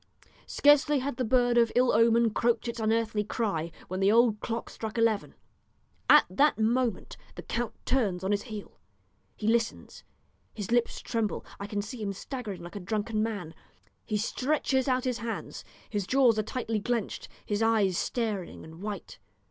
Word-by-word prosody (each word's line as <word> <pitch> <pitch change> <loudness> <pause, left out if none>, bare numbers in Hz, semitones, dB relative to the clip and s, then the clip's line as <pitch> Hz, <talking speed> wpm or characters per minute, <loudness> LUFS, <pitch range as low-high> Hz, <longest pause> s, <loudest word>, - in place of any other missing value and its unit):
Scarcely 290 0 +4
had 270 -1 -3
the 255 - 0
bird 245 0 +3
of 230 -1 +3
ill 250 0 +4
omen 230 0 +4
croaked 235 +1 +1
its 235 0 -4
unearthly 220 -1 +1
cry 195 -7 -2 0.2
when 185 +1 -4
the 195 +1 +4
old 230 -2 +4
clock 230 +1 -4
struck 220 0 -6
eleven. 225 -3 +1 0.7
At - - +8
that 295 +2 +3
moment 230 -1 0 0.2
the - - -8
count 240 -1 -3
turns 200 -9 0
on 190 - 0
his 205 0 +1
heel 215 -4 -9 0.6
he 210 - -7
listens, 230 0 -1 0.5
his 210 -1 -5
lips 240 -1 +1
tremble, 225 -3 -2
I 200 - -5
can 205 0 -2
see 225 +2 -7
him 200 -2 -2
staggering 210 -3 -6
like 175 - -10
a - - -4
drunken 215 +3 -2
man. 205 -7 -3 0.5
He 215 -2 -1
stretches 265 +4 0
out 255 -1 +1
his 250 -3 -1
hands, 230 +1 -5 0.2
his 205 -3 -3
jaws 250 -5 +4
are - - +4
tightly 225 -1 -3
clenched, 235 -1 -2 0.2
his 205 +1 -1
eyes 220 -5 +3
staring 215 -3 -2
and 160 +2 -12
white. 205 0 -6
225 Hz, 170 wpm, -28 LUFS, 205-240 Hz, 0.7 s, At